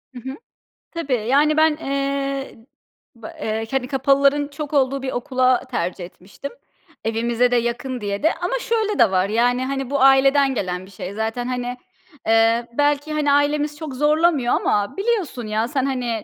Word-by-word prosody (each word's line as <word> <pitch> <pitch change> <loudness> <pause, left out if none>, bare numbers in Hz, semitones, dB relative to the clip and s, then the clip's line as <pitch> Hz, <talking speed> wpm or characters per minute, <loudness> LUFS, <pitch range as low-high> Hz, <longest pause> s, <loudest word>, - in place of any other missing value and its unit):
Hı - - -6
hı. - - -7 0.6
Tabii, 330 -6 -3
yani, 295 +4 +3
ben, 315 -1 +4
eee, 275 -1 -3 0.6
ba 230 -2 -10
eee, 220 +1 -2
hani, 265 -2 -1
kapalıların 275 +2 +2
çok 290 +1 -7
olduğu 275 -1 +2
bir 260 0 -3
okula 255 0 +1
tercih 175 -4 -3
etmiştim 195 +10 -10 0.5
evimize 235 +2 +1
de - - +3
yakın 240 +1 -2
diye 200 -1 -3
de. 320 - +3
Ama 360 +8 -2
şöyle 440 - -1
de 230 -5 +5
var 185 +1 +1
yani, 245 +3 +1
hani, 270 -1 -3
bu 280 -1 0
aileden 270 +1 +5
gelen 185 -3 -3
bir 190 - -16
şey. 190 0 -7
Zaten, 220 +3 -3
hani, 250 -1 -3 0.5
eee, 225 +1 +3
belki, 290 +1 +1
hani, 300 -1 +1
ailemiz 290 +1 +1
çok 305 -3 -6
zorlamıyor 295 -2 +2
ama 205 - 0
biliyorsun 395 - -1
ya 215 +2 0
sen, 265 0 -1
hani, 245 -5 -2
265 Hz, 165 wpm, -21 LUFS, 235-290 Hz, 0.6 s, de